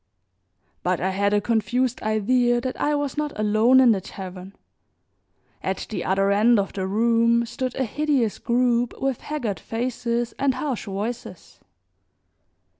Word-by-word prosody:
But 180 -1 0
I 190 +2 0
had 200 +1 +1
a 205 - +3
confused 230 +3 0
idea 240 +3 +2
that 255 +1 -4
I 295 0 +2
was 290 -1 -2
not 300 -1 -2
alone 215 +5 +4
in 255 -3 +6
the 195 -3 +1
tavern. 185 0 -9 1.1
At 190 0 -3
the 215 - -3
other 195 +1 +1
end 220 +4 +4
of 200 -1 -1
the 190 -1 -3
room 230 +3 +2
stood 255 +2 -4
a 265 - 0
hideous 270 -3 0
group 240 0 +1
with 270 -2 -1
haggard 250 -10 -3
faces 240 0 -2
and 275 -2 +2
harsh 275 -7 -3
voices. 215 +5 -6
235 Hz, 145 wpm, -24 LUFS, 205-255 Hz, 1.1 s, in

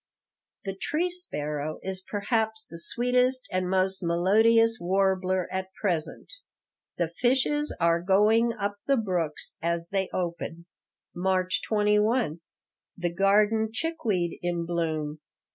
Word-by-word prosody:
"The 195 - -2
tree 330 - -1
sparrow 150 - -4
is 190 0 -3
perhaps 220 +2 -1
the 165 - -10
sweetest 250 +5 +1
and 185 -1 -1
most 190 0 +1
melodious 220 +7 +3
warbler 185 0 +1
at 190 0 -3
present." 170 - -2 0.6
"The 170 - +1
fishes 265 - +1
are 170 0 +3
going 210 +5 +4
up 205 -2 -3
the 275 -1 +4
brooks 180 -8 -1
as 170 0 -1
they 195 -1 0
open." 170 -1 -4 0.5
March 185 0 0
21 210 - +2 0.6
The 175 -1 -2
garden 210 +4 +3
chickweed 225 - -1
in 175 -1 -1
bloom. 160 -3 -2
190 Hz, 115 wpm, -27 LUFS, 170-225 Hz, 0.6 s, going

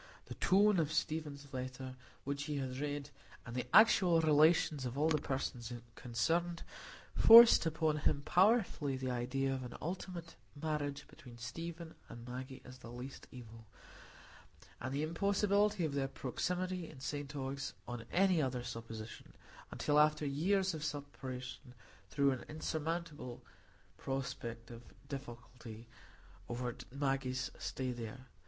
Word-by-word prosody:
The - - -7
tone 200 0 +4
of 155 -2 +1
Stephen's 150 -3 -2
letter, 130 0 -5 0.3
which 140 +1 -3
he 150 -1 -2
had 130 -1 -3
read, 145 0 -3 0.3
and 115 - -7
the 125 - -2
actual 190 -6 +6
relations 155 -2 +4
of 125 +1 -4
all 155 +2 +3
the 155 -1 +2
persons 130 -4 -3 0.2
concerned, 165 +10 -1 0.5
forced 230 -6 +9
upon 160 -1 +1
him 140 -1 +1
powerfully 180 - +3
the 130 -1 -2
idea 130 +2 -1
of 130 - -3
an 125 - -7
ultimate 175 0 -5 0.2
marriage 150 -2 -2
between 120 -3 -13
Stephen 165 +7 -6 0.2
and 120 +1 -9
Maggie 130 +2 -7
as 125 0 -11
the 115 -2 -10
least 125 +2 -8
evil; 115 -3 -11 1.1
and 130 +2 -4
the 140 +2 -1
impossibility 200 +3 +2
of 150 - -2
their 140 -1 0
proximity 180 +7 -3
in 145 - -12
St 145 +1 -4
Ogg's 135 0 -4
on 120 -1 -5
any 185 -3 +4
other 130 -3 -1
supposition, 115 -2 -8 0.3
until 150 0 +2
after 150 0 +4
years 185 +7 +1
of 155 -1 -5
separation, 130 -4 -6 0.3
threw 140 +2 +3
an 130 - -3
insurmountable 155 -4 -4 0.6
prospective 120 -3 -5 0.3
difficulty 120 -4 -8 0.6
over 120 0 -3 0.2
Maggie's 135 -2 -1
stay 130 -1 -3
there. 120 +2 -7
140 Hz, 135 wpm, -35 LUFS, 125-160 Hz, 1.1 s, forced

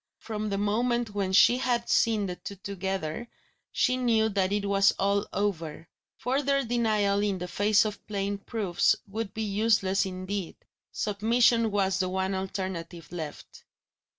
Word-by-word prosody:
From 215 -1 -4
the 200 - -1
moment 230 +2 0
when 195 -2 -1
she 240 +6 +6
had 240 -2 0
seen 220 -3 +2
the 180 -2 -4
two 200 - -8
together, 195 0 -4 0.4
she 255 -1 +2
knew 225 -3 +2
that 195 -2 0
it 205 0 0
was 200 0 +4
all 200 +1 0
over; 165 -6 -2 0.3
further 275 +2 +1
denial 215 -4 +1
in 205 -2 0
the 180 0 -5
face 210 +4 +3
of 210 -1 -6
plain 200 -1 -2
proofs 200 -5 +1
would 210 0 -4
be 220 - -2
useless 200 -2 +2
indeed! 185 0 -4 0.4
Submission 230 +2 +2
was 195 -2 +1
the 185 -1 0
one 190 +1 -1
alternative 185 -4 -5
left. 160 -4 -8
200 Hz, 150 wpm, -28 LUFS, 190-220 Hz, 0.4 s, she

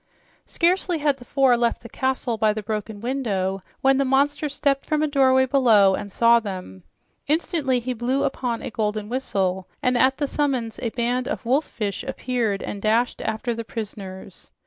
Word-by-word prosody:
Scarcely 355 0 +1
had 290 -2 +1
the 245 - -14
four 265 -1 +3
left 235 -1 0
the - - -8
castle 260 -1 -1
by 215 -1 +2
the 215 0 -5
broken 210 0 -4
window 200 -7 -1 0.2
when 270 0 +4
the 275 - +3
monster 285 +3 +1
stepped 275 -1 0
from 305 -1 0
a - - +2
doorway 260 -2 +4
below 230 -8 +5
and 200 +1 -4
saw 235 +2 +5
them. 185 - -7 0.5
Instantly 300 -4 +1
he 250 +1 -3
blew 250 +4 0
upon 250 -4 -2
a - - -5
golden 210 -1 -2
whistle, 190 -7 -1
and 250 0 +1
at 260 +2 +3
the 290 - 0
summons 265 -6 -1
a 235 - -1
band 245 +2 -1
of - - -4
wolf 270 +6 +2
fish 205 -4 -4
appeared 230 -6 -2
and 200 - -5
dashed 225 +4 +1
after 220 +2 -2
the 230 0 -5
prisoners. 200 -4 -8
245 Hz, 180 wpm, -23 LUFS, 215-270 Hz, 0.5 s, below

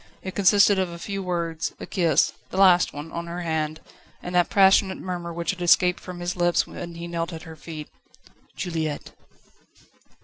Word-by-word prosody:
It 190 - -5
consisted 200 0 +5
of 185 -2 0
a 170 - -8
few 195 +3 -4
words, 170 -3 -2
a - - -6
kiss 165 -5 +2 0.2
the - - -6
last 185 -2 +5
one 150 +3 -8
on 170 0 -5
her 175 +1 -5
hand, 155 -2 -2 0.4
and 180 - -5
that 175 -1 +3
passionate 195 -1 +4
murmur 175 -2 -5
which 170 +1 -2
had 185 -2 -9
escaped 180 +1 +4
from 180 -1 -9
his 175 +1 -2
lips 175 -1 +2
when 170 -1 -8
he 170 0 -6
knelt 170 0 -3
at 160 - -8
her 160 -2 -10
feet: 155 -1 -8 0.7
"Juliette!" 160 -4 -3
175 Hz, 180 wpm, -24 LUFS, 165-185 Hz, 0.7 s, consisted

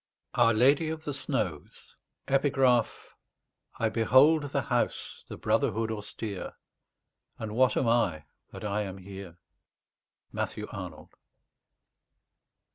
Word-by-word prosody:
OUR 115 -1 +5
LADY 140 +7 +4
OF 160 0 -5
THE 145 - -3
SNOWS 130 - -4 0.3
I 135 -4 -1
behold 130 +8 +5
The 140 - -1
House, - - -2
the - - -8
Brotherhood 110 +1 +1
austere 105 -2 -5 0.8
And 110 -1 -5
what 130 +1 +3
am 125 - +1
I, 95 -10 +2 0.3
that - - -10
I 105 0 -1
am 95 -2 -5
here? 95 -2 -10 0.9
MATTHEW - - -3
ARNOLD. - - -8
115 Hz, 105 wpm, -29 LUFS, 105-135 Hz, 0.9 s, OUR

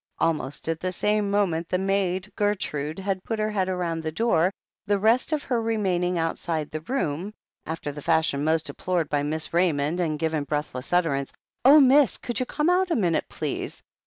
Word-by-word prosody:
Almost 155 -4 -1
at 165 -1 -1
the 185 +2 -2
same 210 +2 +1
moment 175 -5 0
the 180 - +1
maid 190 0 -1
Gertrude 165 -8 -1
had 190 -1 -2
put 225 - -3
her 215 0 -1
head 190 -3 0
round 175 -3 -2
the 160 0 -3
door, 180 -2 +2 0.4
the 205 0 +3
rest 225 +8 +3
of 300 -2 0
her 240 -3 0
remain 205 -6 0
ing 180 0 0
outside 165 -1 -2
the 155 - -4
room, 195 - -3 0.3
after 160 -2 -4
the 145 +1 -8
fashion 160 -3 +1
most 160 +1 +2
deplored 175 -4 -2
by 145 -1 +1
Miss 155 +2 0
Ra3anond, 170 -2 +1
and 160 -4 0
given 155 -1 -1
breathless 145 -3 -3
utterance: 155 -6 +1 0.3
"Oh, 285 +4 +8
miss! 275 0 +5
Could 240 - -3
you 255 - -1
come 300 +1 -1
out 365 +1 +3
a 335 - +1
minute, 175 -7 +1
please? - - -4
180 Hz, 190 wpm, -25 LUFS, 160-210 Hz, 0.4 s, Oh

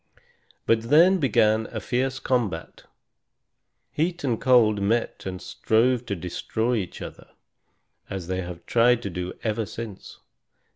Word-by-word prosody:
But 115 0 +1
then 175 +6 +6
began 110 -5 +2
a 110 - -5
fierce 130 +5 -1
combat. 115 -11 -2 1.1
Heat 170 +2 -1
and 120 -5 -1
cold 110 -5 +4
met 115 0 -1
and 90 -1 -5
strove 120 +5 +1
to 100 - -2
destroy 110 +7 -2
each 95 -5 -5
other, - - -10 0.8
as 95 -3 -5
they 95 +1 -2
have 85 -1 -8
tried 120 0 +3
to 100 - -4
do 90 +1 -4
ever 110 -1 -1
since. 110 -2 -8
110 Hz, 135 wpm, -25 LUFS, 100-125 Hz, 1.1 s, then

